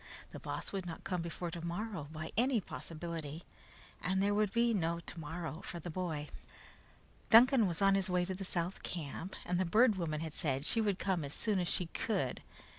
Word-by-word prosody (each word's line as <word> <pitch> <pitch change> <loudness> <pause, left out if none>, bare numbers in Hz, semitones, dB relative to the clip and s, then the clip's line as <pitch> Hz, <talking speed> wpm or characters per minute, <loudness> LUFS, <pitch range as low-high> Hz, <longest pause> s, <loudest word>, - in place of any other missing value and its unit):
The - - -7
Boss - - -4
could 190 -3 -3
not 165 - -6
come 180 -2 -1
before 170 +1 -4
tomorrow 170 0 -4
by 155 0 -5
any 245 +2 +3
possibility, 165 -3 -6 0.6
and 190 +1 +1
there 200 +1 +3
would 210 -1 +2
be 235 +1 +3
no 170 -4 +1
tomorrow 165 0 -5
for 175 - -5
the 175 +1 -6
boy. 155 -4 -3 1.0
Duncan 240 -1 +8
was 170 +2 -1
on 195 0 +6
his 195 -1 +2
way 180 -1 +2
to 190 - -3
the 190 +1 -5
South 180 0 -1
camp, 170 +3 -5
and 180 0 0
the - - +3
Bird 215 +4 +5
Woman 155 -4 -1
had 160 -2 -4
said 140 -2 0
she 225 - +3
would 205 -4 +1
come 185 -5 0
as 140 0 -4
soon 210 -4 +1
as 175 - 0
she 180 - +1
could. 170 - -1
180 Hz, 195 wpm, -34 LUFS, 165-200 Hz, 1.0 s, Duncan